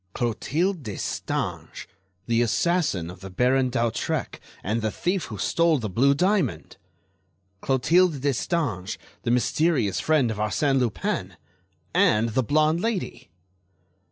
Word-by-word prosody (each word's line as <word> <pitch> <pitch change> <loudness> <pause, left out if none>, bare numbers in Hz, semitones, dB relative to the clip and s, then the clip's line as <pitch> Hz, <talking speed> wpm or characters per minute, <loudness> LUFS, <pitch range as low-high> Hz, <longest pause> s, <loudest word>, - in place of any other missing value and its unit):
Clotilde 155 - -1
Destange, 105 -7 -4 0.4
the 115 +2 +2
assassin 120 - 0
of 90 - -13
the 95 +1 -9
Baron 125 +6 +2
d'Hautrec 120 -2 -2 0.2
and 110 +4 -1
the 110 - 0
thief 180 - -1
who - - -7
stole 165 -2 +2
the 110 -6 -4
blue 140 +8 +3
diamond! 190 +5 0 0.9
Clotilde 155 +5 +3
Destange, 140 - -1 0.2
the - - -3
mysterious 125 - +1
friend 150 -7 +2
of 110 - -5
Arsène 135 +6 +1
Lupin! 120 - -2 0.6
And 110 +2 +3
the 120 +4 +1
blonde 155 +6 +2
lady! 185 - -3
130 Hz, 120 wpm, -25 LUFS, 110-165 Hz, 0.9 s, blue